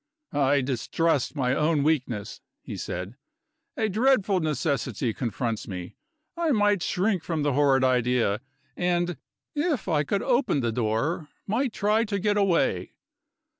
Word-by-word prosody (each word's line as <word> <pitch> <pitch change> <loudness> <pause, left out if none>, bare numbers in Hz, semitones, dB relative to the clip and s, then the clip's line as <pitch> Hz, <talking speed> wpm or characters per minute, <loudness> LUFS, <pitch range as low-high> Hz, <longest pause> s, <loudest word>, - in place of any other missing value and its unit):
"I 140 0 +3
distrust 140 +4 0
my 130 -3 +1
own 150 0 +2
weakness," 130 -9 -1 0.2
he - - -6
said. 90 +7 -5 0.6
"A 220 -3 +1
dreadful 215 -2 +2
necessity 145 -6 -1
confronts 115 -2 -3
me 90 -2 -6 0.4
I 340 -1 0
might 205 - +3
shrink 185 0 0
from 160 -4 -2
the 145 -2 +1
horrid 135 -1 +3
idea, 125 -4 +2 0.3
and, 175 -1 0 0.4
if 295 - -1
I 155 -5 +2
could 195 +7 -1
open 245 - +2
the 120 -1 0
door, 120 +8 -1 0.2
might 240 +5 0
try 215 +2 +2
to 205 -2 -2
get 205 +1 +1
away. 175 - +1
155 Hz, 135 wpm, -26 LUFS, 125-205 Hz, 0.6 s, I